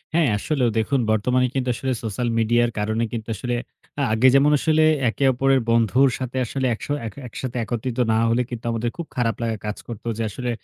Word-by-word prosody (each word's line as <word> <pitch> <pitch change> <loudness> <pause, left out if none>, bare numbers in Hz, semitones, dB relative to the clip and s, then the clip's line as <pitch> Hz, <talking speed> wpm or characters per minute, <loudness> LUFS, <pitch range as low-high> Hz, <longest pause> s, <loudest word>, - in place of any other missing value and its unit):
হ্যাঁ, 160 -7 +4
আসলেও 130 0 0
দেখুন 130 +5 +1
বর্তমানে 125 +4 +2
কিন্তু 130 -1 0
আসলে 130 +2 -2
সোশ্যাল 115 +3 -2
মিডিয়ার 120 +1 +3
কারণে 110 +2 0
কিন্তু 115 -2 -5
আসলে 120 +4 -2 0.4
আ - - +1
আগে 120 +4 +4
যেমন 145 +2 +5
আসলে 155 -1 +3 0.3
একে 135 - -3
অপরের 135 +1 +3
বন্ধুর 115 +4 +4
সাথে 130 0 -4
আসলে 130 +3 -3
একশ - - -9 0.2
এক 110 - -8
একসাথে 125 +1 -5
একত্রিত 120 +3 -3
না 110 - +3
হলে 120 +2 +2
কিন্তু 120 -1 -7
আমাদের 115 +1 -1
খুব 170 - -4
খারাপ 115 -2 0
লাগা 115 -2 -1
কাজ 105 - -3
করতো 115 0 -8
যে 115 - -1
আসলে 125 +3 -4
120 Hz, 200 wpm, -22 LUFS, 115-130 Hz, 0.4 s, যেমন